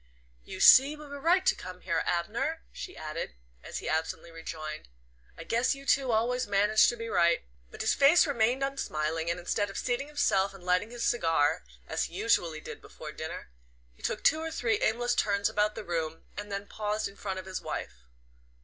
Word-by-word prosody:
"You - - -8
see 275 +3 +8
we 300 0 -11
were 285 0 -8
right 360 +5 +3
to - - +5
come 180 0 -9
here, 170 -3 0
Abner," 235 - -1
she 370 - -8
added, 155 - -5 0.3
and - - -9
he - - -4
absently 160 +1 -2
rejoined: 155 - -7 0.5
"I 165 - -7
guess 235 - +1
you 275 0 -12
two 270 -3 +2
always 240 +2 +1
manage 205 +2 +4
to 240 - +1
be 230 0 -5
right." 170 -5 +3 0.3
But - - -8
his - - +2
face 285 +5 +6
remained 255 -2 +1
unsmiling, 165 - -2
and 170 +1 -1
instead 205 +4 -1
of 195 - -7
seating 250 +3 -1
himself 200 -10 +1
and 190 - -13
lighting 180 +4 +1
his 240 0 -5
cigar, 165 - +2 0.2
as - - -1
he 170 - -10
usually 175 -6 +1
did - - -9
before - - -9
dinner, - - -7 0.4
he - - -22
took - - -2
two 315 - +4
or 325 0 -3
three 230 -8 0
aimless 240 +2 +1
turns 200 -1 +1
about 210 0 +1
the - - -6
room, 165 -3 -3
and 205 0 -6
then 200 0 -3
paused 210 +1 -2
in 200 - -13
front 195 -2 -4
of 185 - -6
his 190 -1 -5
wife. - - -6
205 Hz, 200 wpm, -29 LUFS, 170-250 Hz, 0.5 s, see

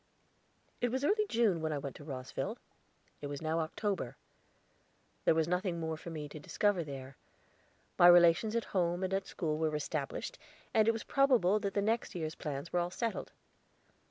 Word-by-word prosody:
It 245 - +2
was 260 +3 -2
early 425 +4 +2
June 215 -8 +2
when 160 0 -1
I 150 - -1
went 140 -2 -5
to - - -11
Rosville; 130 -3 -4 0.6
it 145 - -4
was 145 -1 -5
now 160 +1 -1
October. 165 - -2 1.1
There - - +5
was 160 -1 +2
nothing 180 0 0
more 160 -1 -2
for 165 - -9
me 155 -3 -5
to 155 - -8
discover 190 +4 +1
there. 135 -2 -8 0.8
My 175 - +9
relations 175 +5 +6
at 230 - 0
home 175 -1 +1
and 190 0 -1
at 195 0 -1
school 155 -3 -2
were 155 -1 0
established, 150 -1 -3 0.3
and 220 -1 +4
it - - +7
was 225 -1 -5
probable 245 -8 +3
that 200 -1 -3
the 200 - +2
next 225 0 0
year's 160 -2 -3
plans 145 0 -5
were 175 - +3
all 175 0 0
settled. 230 +5 -3
175 Hz, 185 wpm, -33 LUFS, 155-205 Hz, 1.1 s, My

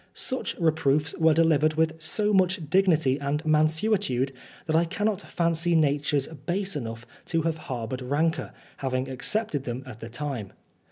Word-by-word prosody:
Such 260 - -1
reproofs 155 -2 +1
were 160 -1 +5
delivered 155 -2 +3
with 160 0 0
so 210 +6 +1
much 185 0 +3
dignity 160 -8 +3
and 140 +2 -2
mansuetude, 155 - +2 0.3
that 155 - 0
I 165 - +5
cannot 205 +4 -1
fancy 170 -1 0
natures 145 -2 +2
base 175 +6 -3
enough 115 -4 -5 0.2
to 165 -2 0
have 165 -1 -1
harboured 125 0 -4
rancour, 150 +6 0 0.3
having 130 -1 -2
accepted 145 - -1
them 125 +1 -4
at 120 -4 -10
the 115 - -8
time. 120 -5 -5
155 Hz, 150 wpm, -26 LUFS, 135-165 Hz, 0.3 s, were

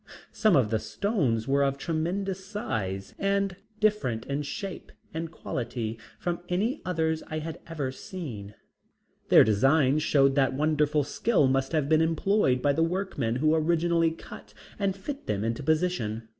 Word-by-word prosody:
Some 215 -4 +3
of 120 -6 +3
the 110 - +2
stones 140 - -1
were 140 +1 +2
of 140 0 +1
tremendous 185 +5 -2
size 105 - -4
and 195 -1 +1 0.2
different 210 - +1
in 140 +1 -2
shape 190 +6 -6 0.2
and 165 +1 -3
quality 115 -7 -4 0.2
from 175 -1 -2
any 215 +11 0
others 160 -3 0
I 155 - -4
have 160 +1 -5
ever 150 -5 -3
seen. 130 - -7 0.7
Their - - +8
designs 135 +7 +3
showed 140 -3 +4
that 135 -1 +2
wonderful 150 0 +2
skill 165 - +2
must 135 0 +1
have 155 -3 +1
been 155 +1 +4
employed 160 -4 +2
by 145 - +3
the 160 - 0
workmen 165 - -1
who 155 +4 +2
originally 165 +1 +2
cut 105 -9 -11 0.2
and 195 -2 0
fit 280 +8 -7
them 100 0 -1
into 115 +5 -2
position. 145 -8 0
155 Hz, 155 wpm, -27 LUFS, 130-180 Hz, 0.7 s, Their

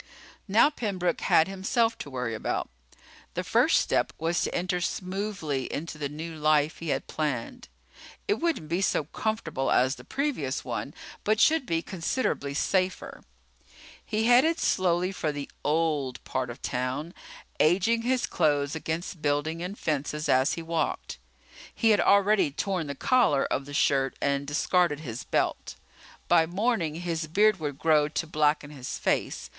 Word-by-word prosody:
Now 220 +9 +5
Pembroke 185 - -2
had 160 - +4
himself 225 +4 0
to 145 - -6
worry 125 -3 -3
about. 110 - -2 0.7
The - - -1
first - - +3
step - - +1
was 165 +2 0
to - - -2
enter 180 0 -1
smoothly 185 -7 -3
into 155 0 -5
the 145 -2 -2
new 160 +3 -6
life 155 0 +2
he 165 - -5
had - - -1
planned. 155 - -3 0.6
It 415 - +1
wouldn't 325 - -1
be 170 +4 -1
so 185 - +1
comfortable 215 -4 -2
as 130 +1 +3
the - - -12
previous 270 - -2
one, - - -4 0.3
but 215 +1 +2
should 310 +1 +4
be 165 0 0
considerably 165 - -2
safer. 185 +4 -1 0.8
He 215 0 -1
headed 255 +8 +5
slowly 180 0 +1
for 160 -5 -2
the 145 -1 -5 0.2
"old" 150 -4 0
part 130 -2 -3
of 120 +3 -9
town, 130 +6 -2 0.5
aging 195 +8 +3
his 250 +1 +1
clothes 145 -4 +1
against 160 +2 -4
buildings 150 +3 0
and 185 +4 -5
fences 150 0 -2
as 130 +2 +3
he 165 - -5
walked. 165 -1 -2 0.6
He 225 -2 +3
had 210 - +4
already 200 -3 +4
torn 175 +3 -2
the 140 - -4
collar 245 - +3
of 135 - -1
the 145 - -9
shirt 135 -2 +2
and 140 0 0
discarded 155 +1 +1
his 125 -5 -6
belt. - - -1 0.5
By 165 -2 +4
morning 185 -4 0
his 165 -2 -3
beard 205 +4 +3
would 145 -3 -4
grow 155 -1 +3
to 155 +2 -3
blacken 150 -1 +1
his 135 -4 -6
face. - - -1
165 Hz, 155 wpm, -27 LUFS, 145-195 Hz, 0.8 s, Now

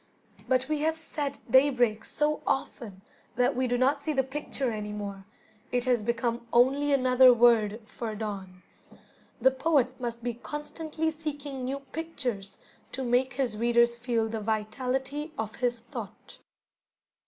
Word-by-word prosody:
But 260 0 +2
we 305 -1 0
have 320 +2 +1
said 290 -3 -4
"daybreak" 245 -4 +4
so 300 +1 0
often 215 -7 -3 0.3
that 250 +3 +2
we 255 0 +1
do 245 0 +1
not 275 +3 +2
see 310 +1 -1
the 265 -2 +2
picture 270 -1 -3
any 210 -1 -4
more, 200 -2 -6 0.4
it 245 0 0
has 245 -3 +2
become 235 +1 -1
only 275 +4 +4
another 255 -1 +6
word 230 -3 +4
for 220 -1 -5
dawn. 195 -4 -6 0.8
The 260 +3 +5
poet 265 -2 +1
must 235 -1 -4
be 240 0 -1
constantly 310 +5 -4
seeking 290 -4 -5
new 270 +2 -3
pictures 260 -9 -5 0.4
to 265 - -3
make 250 +2 +2
his 250 -4 -1
readers 235 +1 +3
feel 235 -2 0
the 225 0 -3
vitality 255 +8 -2
of 220 0 -4
his 240 -2 -1
thought. - - -9
250 Hz, 145 wpm, -28 LUFS, 230-280 Hz, 0.8 s, another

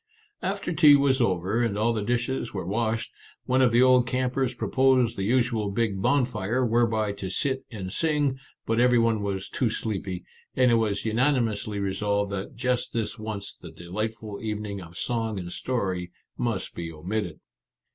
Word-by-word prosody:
After 190 -1 -2
tea 150 -2 +8
was 140 -2 +3
over, 95 +2 +1
and 115 -4 0
all 115 +2 +2
the 110 - -1
dishes 120 +1 -1
were 95 - -3
washed, 110 +3 -1 0.3
one 130 +1 +2
of 125 -2 +5
the 120 +2 +5
old 125 -1 +5
campers 130 0 0
proposed 130 -1 +2
the - - -4
usual 115 -1 +1
big 100 -2 -1
bonfire, 125 -2 +1
whereby 110 -2 +2
to 100 -1 -5
sit 130 +7 -1
and 95 -5 -6
sing, 145 -4 +1 0.3
but 115 +1 +1
every 125 0 +5
one 115 -2 +2
was 100 -1 -3
too 125 - 0
sleepy, 100 -5 -3 0.3
and 130 -1 +4
it - - +4
was 110 -3 +1
unani 125 +4 +2
mously 105 -2 -3
resolved 100 +1 0
that 100 0 -5
just 125 +1 -1
this 115 0 -2
once 110 -2 -4
the - - -12
delight 110 +6 -4
ful 105 -3 -8
evening 105 -2 -4
of 85 0 -11
song 115 -2 -1
and 90 -2 -5
story 95 -9 -2 0.2
must - - -2
be 85 -1 -5
omitted. 85 +1 -4
110 Hz, 175 wpm, -26 LUFS, 100-125 Hz, 0.3 s, tea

